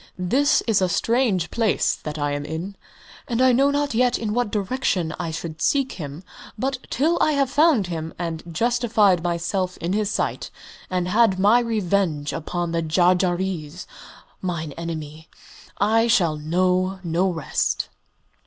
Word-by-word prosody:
"This 250 +11 +2
is 220 -4 +2
a 185 - +2
strange 220 -4 +1
place 225 -3 +1
that 150 0 -7
I 145 -1 -1
am 145 0 -3
in, 160 +6 -5 0.5
and 235 -2 -1
I 260 0 +5
know 270 +3 +4
not 285 -1 0
yet 245 +1 +2
in 215 -2 -3
what 245 -2 0
direction 200 -6 -1
I 170 -2 -2
should 160 -1 -6
seek 275 -2 +1
him. 150 0 -7 0.3
But 265 +3 -2
till 320 +7 +1
I 310 - +3
have 275 -2 +1
found 290 - +4
him, 165 -2 -5
and 165 -2 -4
justified 225 -2 +2
myself 175 +2 -2
in 175 +3 -2
his 210 -1 0
sight, - - -2 0.4
and 180 -1 -1
had 210 0 +3
my 205 +5 +5
revenge 195 -10 0
upon 170 +1 -3 0.2
Jarjarees, 180 -1 +1 0.6
mine 170 -4 -3
enemy, 160 0 -7 0.5
I 225 +3 +3
shall 175 -9 +3
know 185 +4 0
no 175 +3 +1
rest." 160 -5 -1
185 Hz, 150 wpm, -23 LUFS, 165-230 Hz, 0.6 s, I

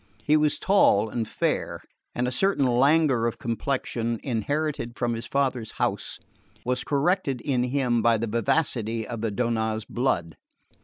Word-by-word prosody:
He 150 - +3
was 150 -1 +2
tall 110 - +3
and 115 -1 -2
fair, - - -1 0.4
and 125 +1 0
a - - -1
certain 195 -2 +1
languor 130 0 +3
of 120 - -3
complexion, 115 -1 -2
inherited 135 0 -2
from 120 -1 0
his 115 +1 -5
father's 130 -4 -1
house, - - -2 0.5
was 125 +1 -1
corrected 140 -1 +1
in 125 0 0
him 125 -3 +1
by 115 0 +4
the 115 - -2
vivacity 115 -1 0
of 115 -3 -5
the 115 - 0
Donnaz 110 -1 -1
blood. 85 - -1
120 Hz, 150 wpm, -26 LUFS, 115-140 Hz, 0.5 s, by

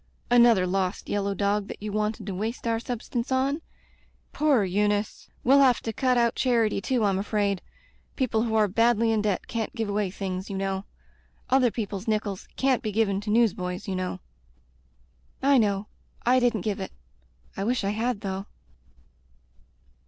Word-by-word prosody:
"Another 235 -6 +6
lost 185 0 -2
yellow 200 -1 -1
dog 200 +1 0
that - - -8
you 210 0 -5
wanted 215 0 -2
to 195 - -4
waste 220 +7 -4
your 230 -1 +1
substance 240 +1 -4
on? 270 +4 +1 0.7
Poor 285 -7 +3
Eunice! 205 +2 -1
We'll 270 +3 +6
have 260 -3 +5
to 225 - -4
cut 255 +2 +2
out 235 -1 +3
charity 230 -5 +1
too, 250 -1 0
I'm 195 -2 +2
afraid. 200 -2 0 0.5
People 230 -5 +1
who 225 -1 -1
are 215 -1 +4
badly 230 +2 +3
in 220 -1 +2
debt 205 -3 -1
can't 230 0 -3
give 225 -3 -2
away 205 -1 0
things, 190 0 -5
you 195 - -3
know. 195 0 -2 0.7
Other 260 -2 +5
people's 210 -3 -5
nickels 210 -3 -2
can't 265 -2 +2
be 215 - -3
given 200 -2 +1
to 210 - -6
newsboys, 190 -5 +1
you 190 - -2
know." 185 - -3 1.2
"I 275 -1 +5
know 200 -2 +1 0.2
— - - -33
I - - +5
didn't 240 -4 +1
give 205 +1 -2
it. 190 - -5 0.6
I 195 - -3
wish 240 +2 0
I 195 - 0
had, 220 0 -1
though." 195 0 -4
215 Hz, 170 wpm, -26 LUFS, 195-235 Hz, 1.2 s, Another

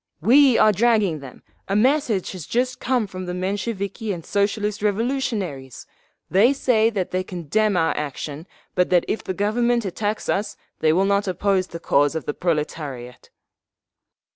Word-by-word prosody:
"We 255 - +6
are 215 - +6
dragging 210 -6 +2
them! 135 -2 -12 0.2
A 195 - -1
message 235 - +2
has 180 -5 -8
just 250 +1 -1
come 250 -3 0
from 185 -2 -7
the 180 - -3
Mensheviki 200 +3 -3
and 170 -4 -6
Socialist 205 +1 -1
Revolutionaries! 205 - -2 0.4
They 215 +9 +4
say 230 -5 +2
that 195 -5 -3
they 185 0 -1
condemn 185 +4 0
our 165 -1 +1
action, 150 +2 -5 0.3
but 180 -1 +1
that 180 -2 +3
if 220 - -2
the 185 - -4
Government 235 +3 +1
attacks 205 +3 -3
us 205 +2 -1 0.2
they 155 - +3
will 185 +4 +2
not 200 +1 +1
oppose 185 0 0
the 170 - -8
cause 145 -2 +2
of 160 - -3
the 145 - -2
proletariat!" 150 -7 -4
195 Hz, 160 wpm, -22 LUFS, 170-220 Hz, 0.4 s, We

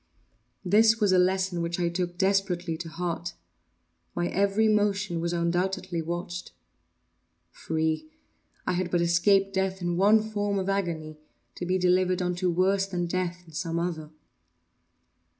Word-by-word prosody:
This 220 +4 +5
was 205 -3 +3
a 185 - +5
lesson 185 -1 +1
which 170 +1 -2
I 175 - +1
took 175 0 -3
desperately 190 -3 +1
to 165 0 -7
heart. 170 +1 -4 0.8
My 175 0 0
every 200 +3 +2
motion 200 -5 +1
was 170 0 -1
undoubtedly 175 0 -1
watched. 175 +2 -5 1.0
Free!—I 160 - -4
had 180 0 -1
but 175 0 +1
escaped 195 +3 +3
death 190 0 -1
in 175 -1 -2
one 210 +3 +5
form 205 -2 -2
of 190 0 -1
agony, 165 -6 -2 0.3
to 175 - -6
be 185 +1 +2
delivered 185 0 +2
unto 180 0 0
worse 190 +3 +2
than 180 -2 -2
death 180 0 -3
in 160 - -17
some 165 +1 -3
other. 165 -3 -3
180 Hz, 140 wpm, -27 LUFS, 170-195 Hz, 1.0 s, This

